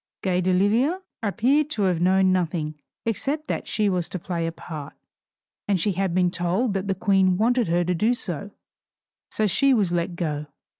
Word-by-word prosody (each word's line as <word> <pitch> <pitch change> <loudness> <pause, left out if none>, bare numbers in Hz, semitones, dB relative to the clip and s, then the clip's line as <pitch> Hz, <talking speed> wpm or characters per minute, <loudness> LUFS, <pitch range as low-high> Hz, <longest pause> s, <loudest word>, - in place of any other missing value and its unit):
Gay 185 -1 +1
d'Oliva 205 - +2 0.2
appeared 250 +8 +2
to 215 -9 -1
have 180 -3 +1
known 190 +1 +4
nothing 165 -4 -1 0.3
except 280 +7 -2
that - - -3
she 210 -1 +1
was 180 -3 0
to - - -4
play 170 -1 -3
a - - -2
part, 155 -3 -8 0.7
and 200 -3 +2
she 200 +5 +1
had 190 -1 -1
been 180 -1 +3
told 185 +7 0
that 195 0 -2
the 195 - 0
Queen 190 -2 +3
wanted 240 +2 +2
her 175 +1 +2
to 180 +1 0
do 220 +8 +2
so, 200 - -5 0.8
so 215 - 0
she 260 +8 +3
was 200 -6 +1
let 175 0 -1
go. 150 -4 -3
190 Hz, 185 wpm, -24 LUFS, 175-215 Hz, 0.8 s, known